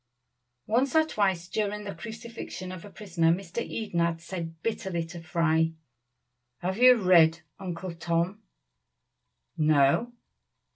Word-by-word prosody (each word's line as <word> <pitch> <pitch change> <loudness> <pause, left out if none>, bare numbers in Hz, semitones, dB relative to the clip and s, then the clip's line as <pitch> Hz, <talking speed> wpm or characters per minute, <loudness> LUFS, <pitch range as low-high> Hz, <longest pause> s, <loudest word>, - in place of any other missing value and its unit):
Once 250 +6 +1
or 315 0 +6
twice 190 - 0
during 210 +1 -2
the 200 -1 -5
crucifixion 225 -5 -7
of 185 -2 -8
a 205 - -10
prisoner 175 -6 +1
Mr. 185 +4 -2
Eden 215 -6 -3
had 170 -1 +1
said 165 -1 -6
bitterly 190 -7 -2
to 170 0 -9
Fry, 160 -1 +1 0.9
"Have 190 +4 -2
you 250 0 +8
read 170 -6 +5 0.2
'Uncle 185 -1 -5
Tom?'" 170 +4 -1 1.1
"No!" 155 - +3
185 Hz, 125 wpm, -28 LUFS, 165-210 Hz, 1.1 s, you